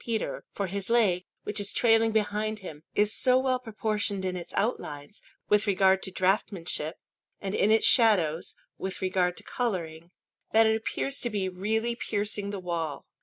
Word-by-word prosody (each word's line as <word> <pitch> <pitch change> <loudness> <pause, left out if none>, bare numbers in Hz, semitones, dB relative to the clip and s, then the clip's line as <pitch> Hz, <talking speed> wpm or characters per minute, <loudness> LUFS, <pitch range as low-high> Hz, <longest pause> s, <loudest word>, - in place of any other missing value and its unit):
Peter; 230 -2 -3
for 200 - -2
his 195 +2 -4
leg, 200 -7 +3 0.2
which 210 - -3
is 205 0 -1
trailing 225 -1 +3
behind 215 0 0
him, 160 -7 -9
is 210 +1 +3
so 255 0 +4
well 260 -1 +1
proportioned 215 -4 -2
in 185 0 -2
its 175 -1 -6
outlines, 150 -6 -3 0.3
with 210 0 +3
regard 190 -1 +4
to - - -2
draughtsmanship, 185 -4 -1 0.4
and 195 -1 -4
in 205 - +2
its 220 0 +4
shadows, 180 - +4 0.2
with 190 0 -4
regard 185 -1 0
to - - -6
colouring, 170 -8 -3 0.4
that 225 0 +6
it 220 0 +3
appears 275 +5 -2
to 240 - +1
be 200 -4 -1
really 220 +6 -1
piercing 205 -3 -2
the 200 -1 -4
wall. 170 -4 -3
205 Hz, 170 wpm, -28 LUFS, 185-220 Hz, 0.4 s, that